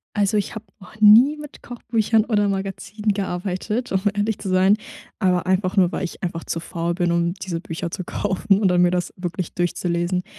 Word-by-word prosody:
Also, 205 0 +2
ich 205 - -2
habe 220 - -7
noch 195 +3 -15
nie 235 +8 +7
mit 295 -1 -11
Kochbüchern 225 -2 0
oder 205 -4 +1
Magazinen 195 +2 -2
gearbeitet, 195 +4 -3
um 190 0 +1
ehrlich 205 +1 -1
zu 190 - -5
sein, 185 +2 +4 0.4
aber 180 -3 +1
einfach 185 +1 0
nur, 180 -2 +4
weil - - -3
ich 180 - -6
einfach 170 -1 -3
zu 165 - -3
faul 170 0 -3
bin, 175 -1 0
um 170 0 +1
diese 180 -3 -4
Bücher 165 0 -5
zu 185 - -4
kaufen 195 +2 0
oder 200 -2 +2
dann 180 0 +3
mir 175 - +4
das 180 -1 -2
wirklich 180 -1 -4
durchzulesen. 175 +1 -1
190 Hz, 195 wpm, -22 LUFS, 175-210 Hz, 0.4 s, nie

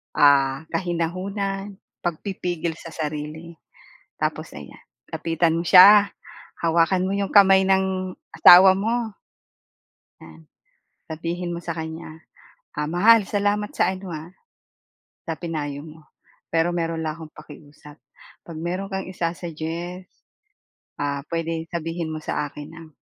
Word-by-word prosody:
ah 140 0 +4
kahinahunan, 195 +4 -3 0.3
pagpipigil 175 -1 -3
sa - - -10
sarili. 155 +2 -6 0.7
Tapos - - -3
ayan, - - -11 0.3
lapitan 165 0 0
mo 170 - -2
siya, 200 +3 +8 0.5
hawakan 170 +2 +2
mo 195 - -2
yung 200 -1 -2
kamay 195 -1 +6
ng 190 -1 0 0.2
asawa 185 +2 +9
mo. 225 +1 -2 1.0
'Yan, 80 -1 -15 0.6
sabihin 170 +2 -4
mo 170 - -6
sa 170 -1 -4
kanya, 160 0 -7 0.5
"Ah, 150 0 -2
mahal, 210 +5 +5
salamat 205 +1 0
sa 180 - +2
ano 185 -2 -7
ha, 155 +3 -8 1.0
sa 165 - -2
pinayo 150 -4 -4
mo. 155 -1 -14 0.5
Pero 165 +1 +2
meron 165 -1 -2
lang 155 +1 -3
akong 160 -2 -11
pakiusap. 150 0 -14 0.5
'Pag 165 -2 -9
meron 180 +4 -4
kang 190 0 -3
isa-suggest, 170 +1 -5 0.9
ah, 140 -1 -2
pwede 165 -1 -2
sabihin 165 0 -3
mo 155 - -5
sa 150 - -2
akin 145 +1 -10
nang 165 0 -11
170 Hz, 125 wpm, -23 LUFS, 160-190 Hz, 1.0 s, asawa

